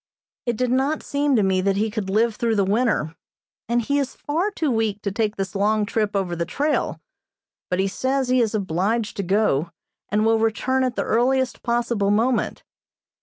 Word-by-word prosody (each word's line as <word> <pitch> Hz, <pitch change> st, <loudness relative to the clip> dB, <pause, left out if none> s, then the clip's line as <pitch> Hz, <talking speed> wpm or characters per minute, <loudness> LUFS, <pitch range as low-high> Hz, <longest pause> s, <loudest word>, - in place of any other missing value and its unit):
It 235 Hz, -2 st, 0 dB
did 250 Hz, 0 st, 0 dB
not 270 Hz, +4 st, +1 dB
seem 285 Hz, -1 st, +1 dB
to 215 Hz, -, +3 dB
me 190 Hz, -1 st, +2 dB
that 195 Hz, +1 st, +1 dB
he 215 Hz, +2 st, 0 dB
could 210 Hz, -3 st, -3 dB
live 220 Hz, +3 st, +2 dB
through 230 Hz, -1 st, 0 dB
the 200 Hz, -2 st, +2 dB
winter, 200 Hz, -6 st, +1 dB, 0.5 s
and 240 Hz, 0 st, +2 dB
he 285 Hz, +5 st, +1 dB
is 270 Hz, -2 st, -3 dB
far 330 Hz, +8 st, -1 dB
too 320 Hz, -8 st, -1 dB
weak 220 Hz, -3 st, 0 dB
to 200 Hz, -, -1 dB
take 215 Hz, +1 st, -1 dB
this 195 Hz, -2 st, -4 dB
long 210 Hz, +2 st, +1 dB
trip 210 Hz, -1 st, -1 dB
over 185 Hz, -3 st, -1 dB
the 170 Hz, -, -1 dB
trail, 290 Hz, -, -1 dB, 0.7 s
but 180 Hz, -, 0 dB
he 195 Hz, -, +2 dB
says 260 Hz, +6 st, -1 dB
he 255 Hz, 0 st, +3 dB
is 220 Hz, -1 st, 0 dB
obliged 205 Hz, +4 st, -1 dB
to -, -, 0 dB
go, 180 Hz, -5 st, +1 dB, 0.4 s
and 210 Hz, +1 st, +1 dB
will 225 Hz, 0 st, +3 dB
return 255 Hz, +4 st, +1 dB
at 255 Hz, -2 st, -1 dB
the -, -, 0 dB
earliest 260 Hz, +3 st, +1 dB
possible 235 Hz, -4 st, 0 dB
moment. 230 Hz, +4 st, +1 dB
220 Hz, 195 wpm, -23 LUFS, 200-255 Hz, 0.7 s, to